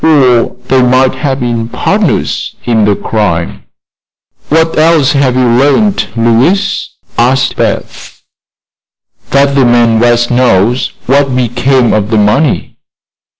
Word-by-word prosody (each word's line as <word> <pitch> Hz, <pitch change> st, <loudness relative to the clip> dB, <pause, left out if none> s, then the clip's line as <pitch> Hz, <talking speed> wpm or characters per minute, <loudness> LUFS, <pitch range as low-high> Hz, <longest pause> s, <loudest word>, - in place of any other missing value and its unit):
Or 130 Hz, -7 st, +2 dB
they 130 Hz, -1 st, +2 dB
might 130 Hz, +1 st, +2 dB
have 135 Hz, -2 st, -3 dB
been 120 Hz, -2 st, -2 dB
partners -, -, -2 dB
in 115 Hz, -3 st, +1 dB
the 105 Hz, -1 st, +1 dB
crime." 95 Hz, -8 st, -3 dB, 0.8 s
"What 160 Hz, +1 st, +1 dB
else 155 Hz, -3 st, +2 dB
have 135 Hz, -3 st, 0 dB
you 130 Hz, -1 st, +1 dB
learned, 140 Hz, -, +1 dB
Louise?" 120 Hz, -, 0 dB, 0.3 s
asked 130 Hz, +3 st, +1 dB
Beth. -, -, -4 dB, 1.1 s
"That 140 Hz, 0 st, +2 dB
the 140 Hz, -1 st, +2 dB
man 120 Hz, -2 st, +2 dB
West 120 Hz, 0 st, +1 dB
knows 120 Hz, -1 st, +1 dB
what 135 Hz, 0 st, +1 dB
became 125 Hz, +1 st, 0 dB
of 105 Hz, -1 st, -1 dB
the 110 Hz, -, 0 dB
money." 105 Hz, +8 st, 0 dB
125 Hz, 120 wpm, -9 LUFS, 115-140 Hz, 1.1 s, Or